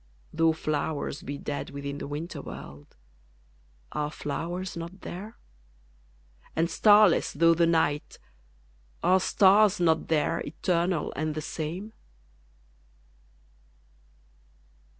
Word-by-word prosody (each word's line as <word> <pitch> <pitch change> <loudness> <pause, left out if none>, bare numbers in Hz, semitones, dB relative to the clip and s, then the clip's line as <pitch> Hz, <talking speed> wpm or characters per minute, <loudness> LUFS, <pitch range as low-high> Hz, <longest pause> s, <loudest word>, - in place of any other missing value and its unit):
Though 165 0 +3
flowers 155 -2 -3
be 140 +1 -5
dead 145 0 -5
within 140 0 -6
the - - -5
winter 150 +4 -5
world, 70 +1 -11 1.0
Are 150 0 -2
flowers 175 +6 -4
not 170 +3 -7
there? 210 +6 -8 1.2
and 165 +2 +1
starless 210 -3 +5
though 165 0 +5
the 170 0 +3
night, 160 -3 0 0.9
Are 185 +1 +5
stars 200 +1 +4
not 160 -2 +2
there, 155 -3 +1
eternal 170 +2 -1
and 155 +1 -2
the 155 - -3
same? 175 +8 -5
165 Hz, 100 wpm, -27 LUFS, 150-180 Hz, 1.2 s, starless